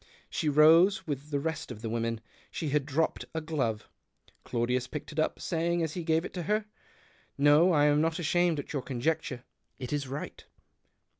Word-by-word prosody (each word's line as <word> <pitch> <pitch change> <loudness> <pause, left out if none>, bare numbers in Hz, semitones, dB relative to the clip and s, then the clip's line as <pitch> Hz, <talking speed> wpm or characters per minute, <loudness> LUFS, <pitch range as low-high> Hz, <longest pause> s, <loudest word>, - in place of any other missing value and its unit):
She 155 - 0
rose 165 +6 +5
with 145 -1 -5
the 145 -2 0
rest 160 +1 -3
of 115 -2 -9
the 115 - -2
women. 115 -1 -2 0.3
She 155 - -4
had 145 0 0
dropped 155 +3 0
a - - +1
glove; 135 -9 -2 0.6
Claudius 125 +1 -1
picked 150 +2 -7
it 155 - -4
up, 155 - 0
saying, 170 0 0
as 160 -2 -2
he 175 - -4
gave 160 +1 +1
it - - -7
to 180 - -4
her 215 0 +1 0.4
— - - -31 0.2
"No, 145 +5 +5
I'm 150 -1 +4
not 160 0 0
amused 175 0 +1
at 145 - -6
your 140 - -1
conjecture 130 0 -2 0.2
— - - -48
it 130 0 -5
is 145 -2 -2
right." 140 +3 -6
150 Hz, 195 wpm, -29 LUFS, 135-160 Hz, 0.6 s, rose